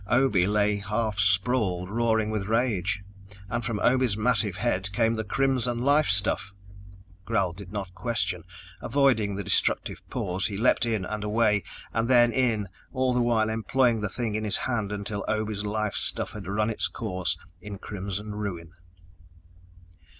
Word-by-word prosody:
Obe 120 -8 +3
lay 105 0 +2
half 105 +1 -2
sprawled, 95 -1 +2
roaring 110 0 +1
with 105 -3 -2
rage, 105 -4 0 0.5
and 120 0 -1
from 110 -1 -2
Obe's 125 -4 +3
massive 110 -4 +2
head 95 -3 -1
came 115 +1 +2
the 110 -1 -2
crimson 125 0 +1
life 145 +4 +3
stuff! 100 0 +2 0.7
Gral 95 -1 0
did 95 0 -10
not 100 -3 -5
question. 105 -5 -1 0.4
Avoiding 120 -8 +2
the 100 - -3
destructive - - +1
paws, 90 +1 -1
he 100 - -4
leaped 120 +2 +3
in 110 -5 -1
and 105 +2 -4
away, 105 -2 +2 0.3
and 115 0 0
then 120 -2 +5
in, 115 -5 +1 0.2
all 130 -1 +1
the 125 - +2
while 115 -2 +2
employing 115 +1 +1
the 105 - -1
thing 115 +1 -2
in 110 +1 -2
his 105 - +3
hand 115 -5 -2
until 100 0 -3
Obe's 110 -1 -1
life 105 -1 -1
stuff - - -1
had 100 -4 -8
run 105 +3 0
its 110 - +1
course 90 -6 -2 0.2
in 100 +1 -7
crimson 100 +1 -5
ruin. 90 -6 -5
105 Hz, 155 wpm, -27 LUFS, 100-115 Hz, 0.7 s, then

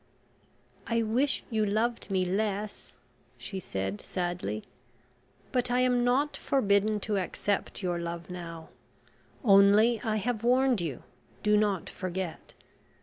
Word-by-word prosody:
"I 230 0 +1
wish 250 +6 +1
you 220 -1 +1
loved 220 +3 0
me 190 -1 +1
less," 205 +2 -2 0.4
she 195 - -6
said 95 - -4
sadly. 175 - -3 0.9
"But 250 -2 +1
I 245 +1 +2
am 250 -1 +3
not 265 +5 +2
forbidden 210 -4 +2
to 205 -1 0
accept 195 +2 -2
your 175 -1 0
love 170 0 -5
now; 165 -3 -8 0.7
only, 210 +2 +6
I 220 -2 -1
have 220 +1 -1
warned 250 -2 +3
you, 155 -7 -4 0.4
do 210 0 +4
not 205 -4 +1
forget. 185 -2 -5
205 Hz, 125 wpm, -29 LUFS, 180-235 Hz, 0.9 s, only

